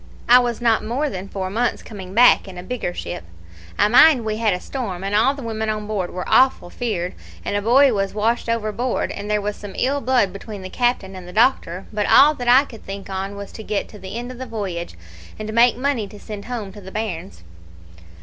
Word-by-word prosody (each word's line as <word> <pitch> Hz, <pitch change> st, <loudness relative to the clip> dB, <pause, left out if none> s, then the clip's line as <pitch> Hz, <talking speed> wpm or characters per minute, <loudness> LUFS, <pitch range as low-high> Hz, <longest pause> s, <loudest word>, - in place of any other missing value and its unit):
I 245 Hz, +1 st, +8 dB
was 240 Hz, -2 st, -1 dB
not 230 Hz, -2 st, +3 dB
more 270 Hz, +7 st, -1 dB
than 190 Hz, -1 st, -6 dB
four 190 Hz, -1 st, -4 dB
months 235 Hz, +3 st, -1 dB
coming 190 Hz, -3 st, -9 dB
back 245 Hz, -3 st, +6 dB
in 185 Hz, -2 st, -9 dB
a 180 Hz, -, -7 dB
bigger 230 Hz, -2 st, -3 dB
ship. 85 Hz, -, -6 dB, 0.5 s
I -, -, +4 dB
mind 250 Hz, +2 st, +6 dB
we 215 Hz, -1 st, -1 dB
had 225 Hz, -2 st, +2 dB
a 180 Hz, -, -1 dB
storm, 195 Hz, -6 st, -5 dB
and 195 Hz, +1 st, -3 dB
all 230 Hz, +7 st, +3 dB
the 280 Hz, -, -8 dB
women 220 Hz, -1 st, -3 dB
on 215 Hz, -1 st, -2 dB
board 205 Hz, -4 st, -2 dB
were 180 Hz, -, -5 dB
awful 255 Hz, -9 st, +3 dB
feared, 190 Hz, -8 st, -3 dB, 0.3 s
and -, -, -2 dB
a 205 Hz, -, +1 dB
boy 255 Hz, +5 st, +5 dB
was 195 Hz, -1 st, -1 dB
washed 230 Hz, +3 st, 0 dB
overboard, 230 Hz, +2 st, -1 dB
and 205 Hz, +1 st, -6 dB
there 210 Hz, 0 st, +1 dB
was 205 Hz, 0 st, -3 dB
some 205 Hz, -2 st, -10 dB
ill 280 Hz, +2 st, 0 dB
blood 245 Hz, -7 st, +2 dB
between 200 Hz, 0 st, -8 dB
the 185 Hz, -, -7 dB
captain 240 Hz, -6 st, 0 dB
and 185 Hz, -1 st, -9 dB
the -, -, -8 dB
doctor; 210 Hz, -5 st, +1 dB
but 210 Hz, -1 st, 0 dB
all 295 Hz, +2 st, +7 dB
that 245 Hz, -4 st, -6 dB
I 255 Hz, +4 st, +6 dB
could 225 Hz, -5 st, -13 dB
think 195 Hz, 0 st, -7 dB
on 195 Hz, +1 st, -4 dB
was 200 Hz, 0 st, -8 dB
to 220 Hz, -, -9 dB
get 210 Hz, -1 st, -2 dB
to 210 Hz, -, -12 dB
the 190 Hz, +3 st, -7 dB
end 245 Hz, +1 st, -5 dB
of 250 Hz, -, -10 dB
the 260 Hz, -, -6 dB
voyage, 190 Hz, -, -5 dB, 0.4 s
and 215 Hz, 0 st, -5 dB
make 235 Hz, +1 st, +5 dB
money 255 Hz, -5 st, -1 dB
to 205 Hz, +1 st, -13 dB
send 205 Hz, -1 st, -8 dB
home 225 Hz, -6 st, -5 dB
to 205 Hz, -, -11 dB
the 190 Hz, 0 st, -10 dB
bairns. 190 Hz, -, -5 dB
215 Hz, 235 wpm, -21 LUFS, 195-240 Hz, 0.5 s, I